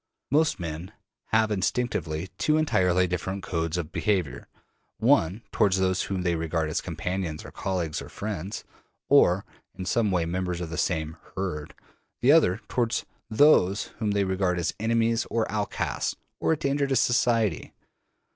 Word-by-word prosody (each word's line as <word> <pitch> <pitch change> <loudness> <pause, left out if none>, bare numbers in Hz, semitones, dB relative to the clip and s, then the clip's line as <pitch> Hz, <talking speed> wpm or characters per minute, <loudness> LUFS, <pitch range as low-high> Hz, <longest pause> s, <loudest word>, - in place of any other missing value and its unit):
Most 155 -3 +3
men 85 +1 -5 0.3
have 110 0 +2
instinctively 95 -5 -1
two 155 0 +3
entirely 90 - +3
different 95 +2 -3
codes 85 -2 -2
of 85 -3 -4
behavior: 95 -8 -1 0.5
one 95 +8 +2
toward 100 -3 +3
those 95 -1 +1
whom 95 -2 -2
they 90 -1 +1
regard 80 -1 -1
as - - -1
companions 90 -4 -4
or - - -9
colleagues 85 -5 -2
or - - -9
friends, 100 -2 -5 0.5
or 90 +3 +5 0.3
in 95 - -6
some 110 +2 +1
way 90 -3 +1
members 90 0 -2
of 85 -2 -5
the - - -3
same 80 -3 -1 0.2
``herd''; 90 -6 -4 0.5
the 130 - +6
other 115 - +4
toward 120 -1 0 0.3
those 110 -6 +4
whom 110 -2 0
they 100 -1 +2
regard 95 -1 0
as 85 -2 -1
enemies 115 +1 +1
or 115 -1 +1
outcasts 105 -1 -2 0.2
or - - +1
a 160 - +2
danger 140 0 0
to 135 - +1
society. 115 -6 +2
95 Hz, 155 wpm, -26 LUFS, 85-110 Hz, 0.5 s, the